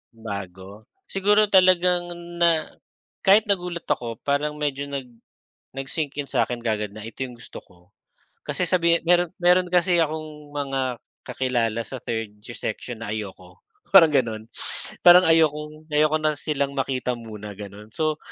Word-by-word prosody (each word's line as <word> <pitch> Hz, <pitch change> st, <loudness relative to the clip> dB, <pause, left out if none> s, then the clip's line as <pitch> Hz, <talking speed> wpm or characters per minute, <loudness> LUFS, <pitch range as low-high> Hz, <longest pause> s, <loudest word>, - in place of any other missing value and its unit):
Bago? 100 Hz, -1 st, -8 dB, 0.2 s
Siguro 205 Hz, +2 st, +3 dB
talagang 180 Hz, -2 st, +4 dB, 0.3 s
na 165 Hz, -2 st, +3 dB, 0.6 s
kahit 200 Hz, +3 st, +6 dB
nagulat 180 Hz, -4 st, -1 dB
ako 115 Hz, -2 st, -2 dB
parang 145 Hz, +1 st, 0 dB
medyo 145 Hz, -1 st, -2 dB
nag 140 Hz, -2 st, -5 dB, 0.7 s
nag-sink 140 Hz, +2 st, -4 dB
in 140 Hz, -, -3 dB
sa'kin 120 Hz, -2 st, -1 dB
kaagad 105 Hz, -2 st, -2 dB
na 110 Hz, -, -8 dB
ito 115 Hz, +3 st, -6 dB
yung 125 Hz, -2 st, -7 dB
gusto 120 Hz, -, -10 dB
ko. 90 Hz, -, -23 dB, 0.7 s
Kasi 180 Hz, -, -1 dB
sabihin 170 Hz, -1 st, +3 dB
meron 175 Hz, 0 st, +3 dB
meron 180 Hz, +1 st, +4 dB
kasi 175 Hz, 0 st, +3 dB
akong 155 Hz, -2 st, -4 dB
mga 135 Hz, -3 st, -2 dB, 0.3 s
kakilala 120 Hz, -3 st, -1 dB
sa 130 Hz, -, -6 dB
third 115 Hz, -2 st, -3 dB
yung 120 Hz, -, -9 dB
section 115 Hz, +1 st, -5 dB
na 105 Hz, -, -4 dB
ayoko, 95 Hz, -4 st, -7 dB, 0.3 s
parang 175 Hz, -4 st, +9 dB
gano'n, 115 Hz, -6 st, +1 dB, 0.6 s
parang 180 Hz, +1 st, +8 dB
ayokong 155 Hz, -1 st, +1 dB
ayoko 150 Hz, +1 st, +3 dB
na 155 Hz, -1 st, +2 dB
silang 140 Hz, -2 st, -2 dB
makita 130 Hz, -1 st, -1 dB
muna, 105 Hz, -2 st, -8 dB
gano'n. 105 Hz, +1 st, -10 dB
So, 155 Hz, +5 st, -1 dB
140 Hz, 145 wpm, -24 LUFS, 115-170 Hz, 0.7 s, parang